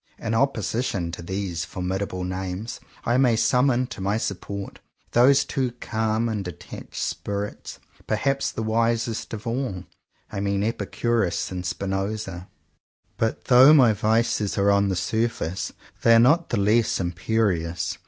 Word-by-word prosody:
In 115 -1 -3
opposition 115 -7 0
to 85 - -7
these 90 -2 -3
formidable 90 +2 -3
names, 95 +4 -4 0.3
I 120 +1 +2
may 125 -3 +4
summon 125 +2 +3
to - - -9
my 100 +3 0
support 100 -1 -5 0.3
those 130 +3 +5
two 130 -4 -1
calm 110 -1 -1
and 110 -3 -2
detached 90 -4 -9
spirits, 100 0 -4 0.3
perhaps 135 +6 0
the 110 - -4
wisest 115 0 0
of 110 0 -6
all 115 -6 -2 0.2
— - - -37
I 100 - -4
mean 100 0 0
Epicurus 110 -5 -1
and 90 -1 -4
Spinoza. 95 0 -3 0.7
But 110 0 -1
though 130 +4 +8
my 125 -6 +6
vices 110 0 +1
are 100 0 +4
on 100 0 +3
the 95 - 0
surface, 95 -3 -1 0.3
they 115 0 +6
are - - +7
not 160 +8 +4
the 120 - 0
less 105 +3 +2
imperious. 90 -1 -1
110 Hz, 145 wpm, -24 LUFS, 95-115 Hz, 0.7 s, though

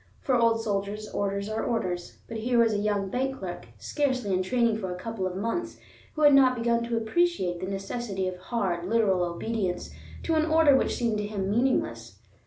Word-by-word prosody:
For 265 - -1
old 230 -2 +3
soldiers, 205 0 -2
orders 200 0 -2
are 215 +1 -2
orders; 180 -7 -2
but 230 - -5
here 240 +2 0
was 230 -2 +4
a 205 - 0
young 205 -2 0
bank 265 +1 -1
clerk, 175 - -7
scarcely 255 -8 -1
in 185 - +2
training 230 +2 +1
for 190 -3 -4
a 180 - -5
couple 210 -1 -3
of 180 - -5
months, 230 - -3 0.4
who 310 - 0
had 290 -1 +8
not 260 -2 +6
begun 235 0 +1
to 235 0 -1
appreciate 225 - +1
the 185 - -4
necessity 195 0 -3
of 185 - -3
hard, 180 -3 -2
literal 210 -5 +3
obedience 180 +2 -2 0.3
to 330 - 0
an 315 0 +2
order 315 -3 +5
which - - +1
seemed 230 -3 0
to 205 - -2
him 200 -2 -2
meaningless. 115 - 0
215 Hz, 195 wpm, -27 LUFS, 190-240 Hz, 0.4 s, had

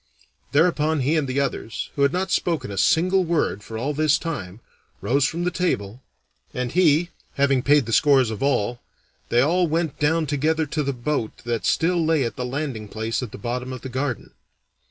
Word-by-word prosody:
Thereupon 155 -1 +2
he 145 +5 +1
and 150 -3 +1
the 130 +2 -1
others, 135 -4 -3
who 140 - -2
had 140 0 +4
not 185 +2 -2
spoken 155 -10 0
a 100 - -6
single 185 - +3
word 165 - 0
for 110 +2 -7
all 135 +6 -2
this 155 0 +3
time, 110 - -5 0.4
rose 135 +2 +1
from 170 +3 -3
the 180 - 0
table, 120 - -2 0.5
and 125 -1 -2
he 170 0 +3 0.2
having 140 -2 +2
paid 145 0 +4
the 115 - -3
scores 135 -5 +4
of 110 - -6
all, 120 -4 0 0.5
they 120 - +4
all 175 +6 +2
went 165 -1 -1
down 160 +2 +2
together 155 +2 0
to 150 +1 -2
the 140 -1 -1
boat 125 -3 -3
that 120 -1 -2
still 170 0 +2
lay 160 -3 +2
at 115 -4 -3
the 125 - -3
landing 130 -5 -4
place 110 +3 -3
at 125 -5 -6
the - - -8
bottom 125 +4 -4
of 130 - -7
the 130 - -6
garden. 130 -1 -3
140 Hz, 195 wpm, -23 LUFS, 125-160 Hz, 0.5 s, had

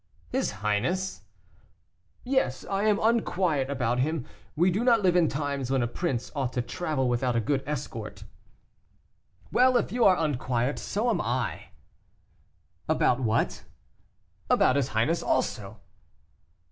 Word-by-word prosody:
"His - - 0 0.2
highness?" 150 - 0 1.0
"Yes, 250 - 0
I 195 +1 0
am 210 -2 +3
unquiet 185 - +1
about 125 -3 0
him. 150 0 -1 0.3
We 175 +4 +3
do 205 +6 0
not 235 -4 +4
live 180 -2 +3
in 175 -3 +4
times 140 -3 -2
when 135 -2 +1
a - - 0
prince 125 -1 -3
ought 130 -3 -2
to 125 - -1
travel 150 -3 -2
without 120 0 0
a - - +3
good 135 +5 0
escort." 150 0 -5 1.3
"Well, 255 0 +5
if - - -1
you 245 0 +1
are 185 -3 +6
unquiet, 130 -4 -1
so 230 +4 -1
am - - 0
I." - - -2 1.2
"About 125 - +2
what?" 115 -3 0 0.9
"About 130 - +4
his 140 -3 +1
highness 140 +9 +1
also." 105 -1 -1
145 Hz, 135 wpm, -27 LUFS, 125-185 Hz, 1.3 s, are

